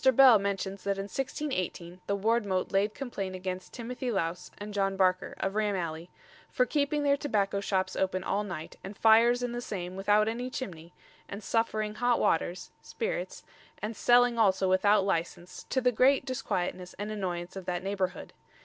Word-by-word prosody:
Bell 255 -5 +8
mentions 195 -1 -3
that 200 0 -1
in 195 - -2
1618 190 - -4
the 200 - 0
wardmote 205 -3 0
laid 205 +2 +1
complaint 200 -8 -4
against 185 0 -5
Timothy 250 +2 -5
Louse 180 -5 -2
and 205 0 -7
John 195 -1 0
Barker, 185 0 +1
of 195 - -1
Ram 210 -1 +1
Alley, 165 -1 -4 0.4
"for 250 - +2
keeping 295 +1 0
their 280 -1 +4
tobacco 205 -9 0
shoppes 190 -1 -1
open 185 -1 0
all 205 +2 0
night 175 -6 -7
and 195 +2 -8
fyers 235 +2 +5
in 245 - -1
the 240 0 -4
same 185 -5 -5
without 205 +2 +3
any 240 +3 -2
chimney 170 -10 -6 0.4
and 200 +1 -7
suffering 215 0 0
hot 245 +2 +1
waters 175 +2 0
[spirits] - - -4 0.4
and 215 +2 -4
selling 245 0 +4
also 190 -3 +3
without 195 +2 +4
licence, 175 -1 -3
to 260 - +1
the 250 0 +3
great 260 +4 +4
disquietness 180 -8 -3
and 205 +1 -4
annoyance 180 -4 -4
of 190 -2 -7
that 180 0 -2
neighbourhood." 190 -2 -3
200 Hz, 170 wpm, -29 LUFS, 185-235 Hz, 0.4 s, Bell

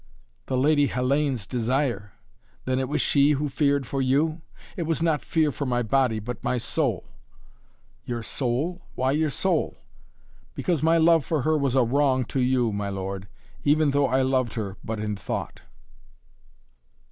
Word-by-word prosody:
"The 130 - -1
Lady 145 +2 +3
Hellayne's 130 -2 0
desire? 120 -3 -1 0.5
Then 130 0 0
it 130 -1 -2
was 150 - 0
she 145 +1 +4
who 145 +1 -1
feared 140 0 +1
for 135 +2 -2
you?" 150 +5 +1 0.3
"It 170 -3 -3
was 165 0 0
not 160 -3 +1
fear 155 -2 +1
for 140 0 -4
my 120 -1 +1
body, 125 0 +2
but 115 +2 -6
my 125 - 0
soul." 120 - -1 1.0
"Your 120 -1 -4
soul? 140 +10 -2
Why 130 +1 +1
your 155 +2 +1
soul?" 140 - -1 0.8
"Because 170 -5 -1
my 165 +1 +4
love 165 -1 +5
for 155 -3 -1
her 155 +3 +2
was 140 -4 0
a 130 - +5
wrong 130 +1 +2
to 135 - +1
you, 125 -2 +2
my 100 0 -2
lord, 95 0 -5 0.4
even 150 0 +3
though 140 0 +2
I 130 +1 +2
loved 130 -3 0
her 100 -4 -4
but 110 -1 -4
in 105 -1 -2
thought." 100 - -5
135 Hz, 165 wpm, -25 LUFS, 120-150 Hz, 1.0 s, love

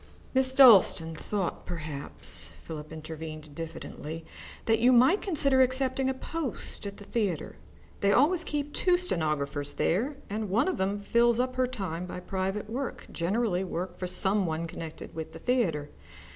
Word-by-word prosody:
"Miss 260 0 +5
Dalstan 205 -11 +6
thought, 195 +3 -3
perhaps," 155 -5 -4
Philip 155 -2 -7
intervened 155 -1 -8
diffidently, 165 0 -7 0.4
"that 225 -1 +3
you 245 +2 +5
might 255 - +5
consider 280 -8 +2
accepting 260 +1 +2
a - - +1
post 275 -7 -3
at 200 - -7
the 205 - -11
theatre. 200 -6 -2 0.4
They 200 - +3
always 325 - +4
keep 295 -2 -3
two 360 -1 +3
stenographers 150 - -1
there, 255 - 0
and 210 0 -3
one 225 - +2
of 375 - 0
them 195 +2 0
fills 235 +3 +3
up 255 0 0
her 255 0 +2
time 180 -8 -4
by 180 - -6
private 190 +3 -3
work, 250 +4 -5
generally 190 +1 0
work 180 0 -4
for 185 - -2
some 190 +1 +3
one 160 +1 -2
connected 165 -1 -8
with 160 -1 -6
the 165 - -9
theatre. 165 - 0
200 Hz, 160 wpm, -29 LUFS, 165-255 Hz, 0.4 s, Dalstan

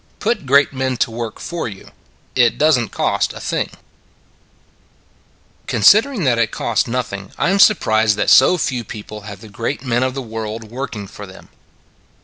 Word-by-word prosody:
PUT 200 - -1
GREAT 140 +2 +4
MEN 130 -1 -2
TO 115 - 0
WORK 115 -1 -5
FOR 170 -5 -5
YOU: 100 -3 -10 0.4
IT 120 -2 +3
DOESN 150 -6 +3
T - - -13
COST - - -1
ANYTHING - - -2 2.0
CONSIDERING 215 - +4
that 120 -4 +2
it 115 -2 +2
costs - - -1
nothing, 110 -6 -4
I 175 - +1
am 200 - +1
surprised 110 - +4
that - - +1
so 180 - +6
few 125 -7 -2
people 105 0 -9
have 100 - -10
the 110 - -11
great 115 +7 -4
men 120 -1 +1
of 130 0 -1
the 135 - -3
world 110 -1 -6
working 120 -5 -5
for 100 +1 -10
them. 95 - -15
120 Hz, 165 wpm, -18 LUFS, 110-140 Hz, 2.0 s, so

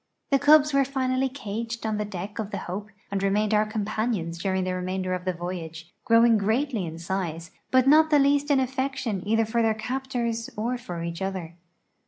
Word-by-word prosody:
The 275 - +4
cubs 300 +1 +6
were 275 0 +4
finally 265 -1 0
caged 230 -2 -5
on 215 -1 0
the 210 - -1
deck 205 +1 -6
of 210 -2 -3
the - - -4
Hope 200 +4 -5 0.2
and 200 -1 -1
remained 205 +2 +1
our 215 0 +3
companions 215 -5 -2
during 190 0 0
the 185 0 -1
remainder 185 0 -2
of 180 0 -4
the 185 - +1
voyage, 170 -1 -6
growing 230 -1 +5
greatly 220 - 0
in 160 0 -7
size 170 -1 -4 0.2
but 255 -1 +4
not 315 +2 +6
the 300 - +5
least 285 +1 +3
in 280 -2 +4
affection 260 -5 -2
either 225 +1 +3
for 230 +2 0
their 220 -1 +2
captors 240 -1 -3
or 235 +4 -1
for 175 -7 -6
each 170 +1 -5
other. 190 -4 -4
215 Hz, 195 wpm, -26 LUFS, 185-255 Hz, 0.2 s, cubs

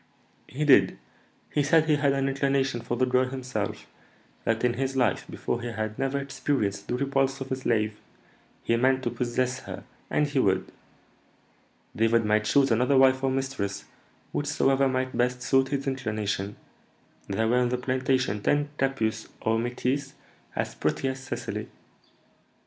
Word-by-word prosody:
"He 150 +4 -2
did. 140 - +5 0.5
He 150 - +2
said 155 +2 +4
he 155 -2 +3
had 140 -1 +2
an 135 0 0
inclination 135 -2 0
for 120 +1 -3
the 130 - +3
girl 130 0 +3
himself; 130 -1 -4 0.6
that 115 +1 0
in 125 -1 +3
his 135 +2 -2
life 125 -3 +1
before 120 - -3
he 120 - -4
had 110 -1 -4
never 135 +1 0
experienced 135 -6 -2
the 125 - -1
repulse 135 0 0
of 135 0 -6
a - - +2
slave; 110 -4 0 0.6
he 115 - +2
meant 130 +2 +2
to 120 - -1
possess 125 +2 -1
her, - - -8 0.3
and 150 - +2
he 145 -2 0
would. 95 -6 +1 1.2
David 115 +1 +3
might 105 0 +2
choose 135 +2 +3
another 125 +4 +3
wife 130 0 +5
or 135 - +3
mistress, 130 -7 -2 0.5
whichsoever 135 -2 +2
might 130 0 -1
best 125 0 0
suit 135 +1 +3
his 140 0 -2
inclination; 105 -6 -2 0.7
there 110 0 0
were 120 +2 +3
in 125 - +2
the 125 - 0
plantation 130 -4 0
ten 145 +5 +1
capusses 115 -5 0
or 110 0 +1
métisses 125 +4 -2 0.4
as - - -2
pretty 135 - -1
as 130 0 -4
Cecily. 130 0 -5
130 Hz, 160 wpm, -27 LUFS, 115-135 Hz, 1.2 s, did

